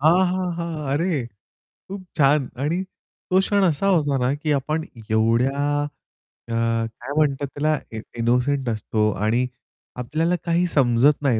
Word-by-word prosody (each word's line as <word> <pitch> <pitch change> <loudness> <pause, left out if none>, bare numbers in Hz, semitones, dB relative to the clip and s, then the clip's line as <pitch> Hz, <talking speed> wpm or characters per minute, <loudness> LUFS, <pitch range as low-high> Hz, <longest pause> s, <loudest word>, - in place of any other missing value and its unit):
हां, 175 +5 +5
हां, 180 -1 -1
हां, 160 -5 -3
अरे 170 +6 +1 0.8
खूप 195 -1 -6
छान 140 -1 +4 0.2
आणि 170 +5 0 0.5
तो 185 +1 +4
क्षण 200 0 +2
असा 180 +2 +2
होता 145 -7 +2
ना, 125 +1 +1
की 150 +1 -2
आपण 150 +3 0 0.3
एवढ्या 115 +5 +2 0.9
अ, 115 - -8
काय 115 +3 -1
म्हणतात 140 -2 +1
त्याला 155 +1 +1
इ 110 - -5 0.2
इनोसेंट 125 +3 +1
असतो 110 -1 0 0.2
आणि 120 +4 +2 0.5
आपल्याला 160 +8 0
काही 170 +1 +2
समजत 135 0 +3
नाही. 125 -6 +2
145 Hz, 140 wpm, -23 LUFS, 125-165 Hz, 0.9 s, हां